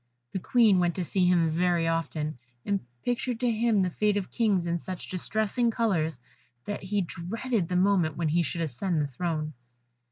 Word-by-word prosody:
The 190 - -2
Queen 215 -2 +4
went 175 -1 +1
to 185 - -1
see 180 +1 +1
him 175 -2 +4
very 170 0 +2
often, 155 -3 -2 0.3
and 200 -1 +1 0.3
pictured 245 -1 -1
to 245 -1 +3
him 220 -3 +2
the 180 - -1
fate 210 +3 +1
of 195 - -3
kings 205 -7 +1
in 170 0 -1
such 185 +1 -6
distressing 220 +5 0
colours, 180 - 0 0.5
that 205 - -4
he 200 +1 0
dreaded 195 +4 -2
the 180 - -2
moment 180 -4 +2
when 165 -2 0
he 170 +3 +3
should 170 +1 -2
ascend 165 +3 -1
the 150 - +1
throne. 155 +2 -3
180 Hz, 185 wpm, -28 LUFS, 165-210 Hz, 0.5 s, Queen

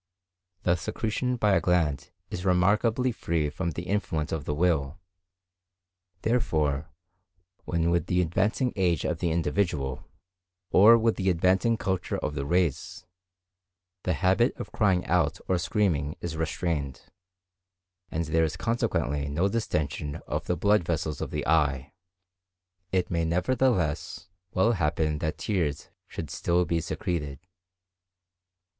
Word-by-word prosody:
The 85 0 +2
secretion 110 +6 -2
by 105 -4 +2
a - - +3
gland 80 -6 +1 0.2
is 90 - -4
remarkably 105 +7 +2
free 80 -8 -1
from 85 +4 -2
the 85 +1 -5
influence 90 -5 -2
of 80 -4 -3
the 75 - -1
will; 80 -2 +1 1.3
therefore, 80 - 0 0.8
when 85 -1 0
with 85 -2 +1
the 90 - +1
advancing 100 +9 +1
age 90 -5 +1
of - - -1
the 85 - 0
individual, 80 -5 -1 0.7
or 110 +5 +8
with 115 0 +1
the 95 -1 +1
advancing 95 +6 +2
culture 95 -3 -2
of 75 - -3
the 70 0 -3
race, 85 -3 0 1.0
the 90 - 0
habit 95 - +2
of - - -7
crying 95 -5 +2
out - - +1
or 90 -2 +1
screaming 85 -7 0
is 85 -2 -4
restrained, 80 -3 -2 1.1
and 85 0 -2
there 80 +2 +2
is 80 0 -1
consequently 75 - -1
no 85 +7 +1
distension 75 -9 -2
of - - -3
the 90 - 0
blood 100 +2 +3
vessels 80 -2 -2
of - - -3
the - - -3
eye, 75 -3 +1 1.0
it 90 -1 0
may 85 -1 +1
nevertheless 90 - 0 0.2
well 105 +6 +3
happen 75 -5 0
that 80 -1 -2
tears 85 -9 -2 0.2
should 80 -5 -6
still 85 +5 +1
be 85 +1 0
secreted. 75 -5 -3
85 Hz, 135 wpm, -27 LUFS, 75-95 Hz, 1.3 s, or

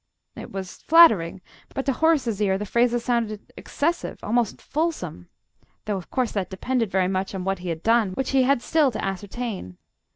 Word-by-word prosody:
It - - -9
was 190 -2 -6
flattering, 215 - +5 0.3
but 270 - -2
to 275 - +1
Horace's 255 -8 +1
ear 190 -2 +2
the 210 - -4
phrases 235 +2 +1
sounded 230 -4 -2
excessive, 335 +4 -2
almost 230 0 0
fulsome 275 - -3 0.6
though, 210 -2 -1
of 185 - -9
course, 255 -3 0
that 195 -3 -2
depended 230 +3 -1
very 190 -1 +1
much 190 +1 -2
on 185 - -4
what 195 0 -1
he 180 0 -5
had 160 -1 -4
done, 225 -4 +3
which 265 +6 -2
he 270 -1 +4
had 255 -1 +2
still 310 -4 +3
to 230 - -4
ascertain. 195 - -5
220 Hz, 185 wpm, -24 LUFS, 190-255 Hz, 0.6 s, flattering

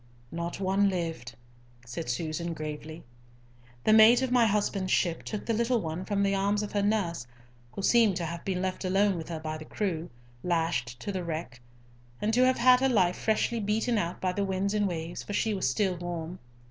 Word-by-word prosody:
"Not 170 +2 -4
one 195 +1 +2
lived," 165 -10 -4 0.5
said 125 +5 -6
Susan, 160 +6 -2
gravely. 155 +1 -7 0.8
"The 215 - +4
mate 225 +3 +7
of 260 - -1
my 245 -2 +5
husband's 200 -2 0
ship 170 -2 +1
took 210 - -5
the 230 - 0
little 235 +2 +1
one 165 0 -4
from 200 0 0
the 195 0 +2
arms 200 +2 +1
of 210 - -5
her 205 - 0
nurse, 195 - 0 0.5
who 195 - -5
seemed 225 -4 +4
to 175 -2 -2
have 170 +1 -5
been 185 -1 -2
left 185 +1 -3
alone 195 +1 +2
with 165 -1 -6
her 165 -2 -4
by 155 0 -5
the 155 - -9
crew, 175 -5 -3 0.3
lashed 160 -8 -1
to 205 - -3
the 185 -2 -3
wreck, 155 -7 -5 0.6
and 215 +2 0
to 250 +2 +4
have 255 - +2
had 250 +1 +6
her 265 +1 +2
life 185 -7 +3
freshly 220 +1 0
beaten 220 +2 0
out 170 -2 -3
by 185 - 0
the 200 - -1
winds 195 +1 -1
and 205 -1 +1
waves, 170 -1 -4
for 205 - -7
she 220 +1 +1
was 190 - 0
still 195 -4 0
warm. 175 0 -5
185 Hz, 205 wpm, -28 LUFS, 165-210 Hz, 0.8 s, mate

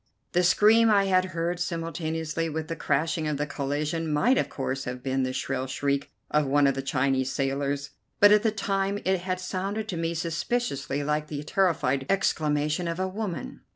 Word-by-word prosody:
The 180 - +3
scream 215 +5 +5
I 200 -2 +5
had 185 -1 +3
heard 175 -1 -2
simultaneously 165 -1 -2
with 155 +1 -4
the 165 - -2
crashing 155 +2 0
of 150 -2 -1
the 145 - -1
collision 150 +3 -2
might 240 - +3
of - - -1
course 135 0 -3
have 125 0 -5
been 135 0 0
the 130 0 0
shrill 130 0 -2
shriek 140 +1 -1 0.2
of 150 -2 +2
one 145 +1 +4
of 135 - +4
the 135 - -3
Chinese 135 -1 0
sailors, 140 +1 -1 0.3
but 205 0 +8
at 210 0 +6
the 225 - +2
time 195 -1 -1
it 190 0 +2
had 185 +1 -3
sounded 195 +4 -3
to 175 - -3
me 165 0 -1
suspiciously 165 - -2
like 150 +1 -1
the 145 -1 -5
terrified 155 -6 +1
exclamation 155 -3 +1
of 170 +1 -3
a 190 - 0
woman. 190 - -5
160 Hz, 190 wpm, -27 LUFS, 140-185 Hz, 0.3 s, but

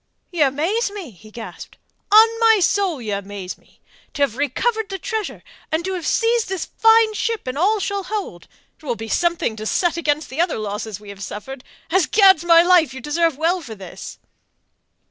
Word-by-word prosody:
"Y'amaze 330 - +1
me!" 395 - -8
he 215 +2 -17
gasped. 225 +1 -10 0.3
"On 435 +2 +8
my 450 -2 +5
soul, 375 -4 +1
y'amaze 200 -3 -5
me! - - -29 0.4
To 285 - +1
have 255 -5 0
recovered 415 - -1
the 390 - -4
treasure 440 +1 -4 0.3
and 320 +2 -1
to 380 - -2
have 355 -3 -4
seized 460 -1 +1
this 380 -3 -3
fine 445 0 +4
ship 455 +1 -2
and 255 0 -4
all 405 +8 +2
she'll 400 -1 -3
hold! 395 - -5 0.3
It - - -25
will 250 -5 -2
be 225 0 -7
something 340 -4 0
to 215 0 -5
set 345 +4 +1
against 305 -2 -1
the 285 +5 0
other 345 -1 0
losses 210 -1 -5
we 210 -1 -13
have 200 -1 -10
suffered. 250 +7 -7 0.3
As 365 -2 +3
Gad's 385 -5 +5
my 335 -1 +6
life, 345 -7 +4
you - - -6
deserve 295 +2 0
well 340 +4 +1
for 235 -8 -9
this." 190 -3 -10
330 Hz, 185 wpm, -20 LUFS, 245-400 Hz, 0.4 s, On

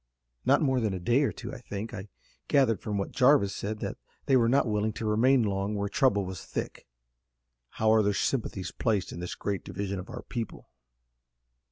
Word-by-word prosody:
"Not - - +4
more 130 -3 +2
than 110 -5 0
a - - -4
day 120 +9 +2
or 145 - +2
two, - - -8
I 135 - -7
think. 110 -1 -6
I 105 -1 -6 0.4
gathered 130 -7 +3
from 105 -2 -2
what 100 - -2
Jarvis 130 -6 +4
said 105 +1 -4
that - - -4 0.3
they 135 - +4
were 115 -2 +4
not 135 +3 +4
willing 105 -1 0
to 110 - -5
remain 120 +4 +4
long 100 0 -1
where 100 0 -1
trouble 100 -4 +2
was 95 -2 -6
thick." - - -5 0.9
"How 110 0 +3
are 110 0 +5
their 105 -1 +2
sympathies 100 -8 -1
placed 105 -6 0
in - - -7
this 90 0 -5
great 100 -2 -3
division 100 0 -4
of 90 - -9
our - - -7
people?" 115 -3 -6
110 Hz, 200 wpm, -28 LUFS, 100-125 Hz, 0.9 s, are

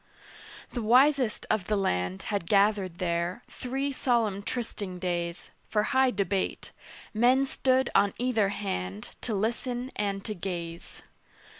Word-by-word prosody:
The 240 - -2
wisest 255 +1 +4
of 200 -5 0
the 215 - +2
land 90 - -1
Had 200 -5 -2
gathered 200 -3 +3
there, 175 +4 -1
three 270 +3 -3
solemn 230 -7 +1
trysting 205 -5 -4
days, 175 -1 -3 0.2
For 210 -1 +2
high 265 0 +5
debate: 200 -3 -1 0.4
men 250 +5 +4
stood 260 -1 +1
on 200 0 +3
either 235 -5 +2
hand 100 - -4
To 225 - -2
listen 240 +4 -1
and 200 -1 -2
to 215 - -2
gaze. 170 -3 -6
205 Hz, 130 wpm, -28 LUFS, 180-245 Hz, 0.4 s, high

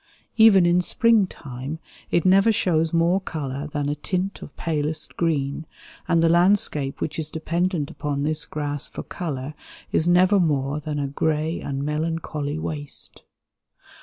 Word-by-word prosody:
Even 220 -5 +7
in 175 +1 +4
spring 225 +2 +3
time 135 0 -7 0.3
it 170 - +1
never 195 +4 +5
shows 165 -6 +1
more 170 +3 +2
color 145 -4 -4
than 145 -1 -2
a 145 - 0
tint 185 +6 -3
of - - -11
palest 155 -1 -2
green, 155 -2 -1 0.4
and 170 -2 +3
the - - +5
landscape 170 -5 +2
which 155 +1 -3
is 155 -1 -2
dependent 165 -1 -1
upon 140 -1 -3
this 155 0 -1
grass 145 -1 -3
for - - -7
color 145 -4 -5 0.4
is 160 - +2
never 185 +3 +5
more 145 -4 0
than 150 0 -4
"a 145 - -1
gray 155 +3 -1
and 140 0 -3
melancholy 150 -1 -2
waste." 150 -2 -6
155 Hz, 150 wpm, -23 LUFS, 145-175 Hz, 0.4 s, Even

